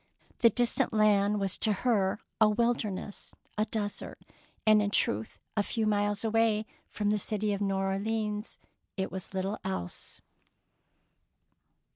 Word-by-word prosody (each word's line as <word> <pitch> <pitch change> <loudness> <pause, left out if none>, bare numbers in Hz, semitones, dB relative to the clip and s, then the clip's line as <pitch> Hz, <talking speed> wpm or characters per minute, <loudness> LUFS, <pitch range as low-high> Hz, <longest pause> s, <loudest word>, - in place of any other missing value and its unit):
" - - -32
The 230 - +8
distant 240 +2 +2
land 210 -1 +3
was 195 -2 0
to 220 - +2
her 205 -5 +2 0.2
a 215 -1 +6
wil 235 +3 +3
derness, 205 -3 -6 0.2
a 215 - +1
desert; 210 -2 -3 0.5
and, 215 -1 +6
in 205 - +1
truth, 110 - 0 0.2
a 210 - +3
few 220 +2 -1
miles 205 0 +1
away 225 -1 +2 0.2
from 210 -1 0
the 210 - +1
city 210 +1 -1
of 200 - -3
New 195 -1 +1
Orleans 210 +2 -2 0.4
it 190 - -2
was 190 +1 -7
little 195 +3 -2
else. 185 - -5
210 Hz, 145 wpm, -30 LUFS, 195-215 Hz, 0.5 s, The